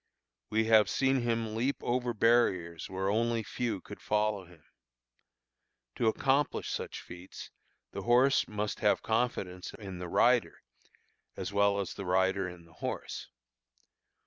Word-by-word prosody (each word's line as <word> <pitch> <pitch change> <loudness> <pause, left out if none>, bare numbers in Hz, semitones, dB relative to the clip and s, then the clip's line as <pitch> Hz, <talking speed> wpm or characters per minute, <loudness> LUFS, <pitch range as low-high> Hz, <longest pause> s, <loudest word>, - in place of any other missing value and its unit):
We 110 +1 +2
have 110 -1 +5
seen 135 -1 +2
him 115 -2 -1
leap 130 +5 +1
over 125 0 0
barriers 95 -8 +2
where 95 0 -2
only 115 +1 +1
few 110 -1 -3
could - - -11
follow 105 -2 0
him. 85 -3 -19 1.3
To 115 - +1
accomplish 135 +5 +1
such - - -4
feats 90 +1 -10 0.4
the - - -5
horse 125 +3 +4
must 105 0 -3
have - - +2
confidence 110 -6 -2
in 95 -4 -8
the 90 -1 -5
rider 120 +6 +2 0.7
as 100 - -4
well 100 0 +3
as 100 - -3
the 100 - -7
rider 95 +1 +1
in 90 -2 -12
the 85 - -20
horse. - - -5
105 Hz, 140 wpm, -31 LUFS, 95-120 Hz, 1.3 s, have